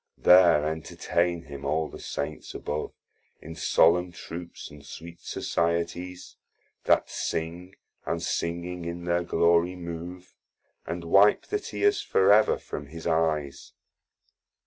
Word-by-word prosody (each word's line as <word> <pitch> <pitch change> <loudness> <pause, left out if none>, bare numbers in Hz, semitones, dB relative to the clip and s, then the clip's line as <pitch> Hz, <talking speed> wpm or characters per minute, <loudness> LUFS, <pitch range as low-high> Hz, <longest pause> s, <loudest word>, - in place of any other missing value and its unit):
There 85 -4 +6
entertain 85 +2 -1
him 70 0 -9
all 80 0 0
the - - -11
Saints - - -5
above, 75 +1 -4 0.5
In 80 - -9
solemn 90 +2 +3
troops, 85 0 -9
and 75 -1 -13
sweet 85 +4 -10
Societies 85 +2 -3 0.5
That - - +3
sing, 85 +3 -4 0.3
and - - -2
singing 85 +1 -3
in 85 +1 -5
their 85 0 +1
glory 85 +1 +2
move, 90 +1 -8 0.5
And 85 0 -4
wipe 100 +5 +5
the 415 - -2
tears 410 0 0
for 95 +1 +4
ever 110 +1 +4
from 75 - -7
his 80 +2 -10
eyes. 80 -4 -1
85 Hz, 125 wpm, -27 LUFS, 80-90 Hz, 0.5 s, There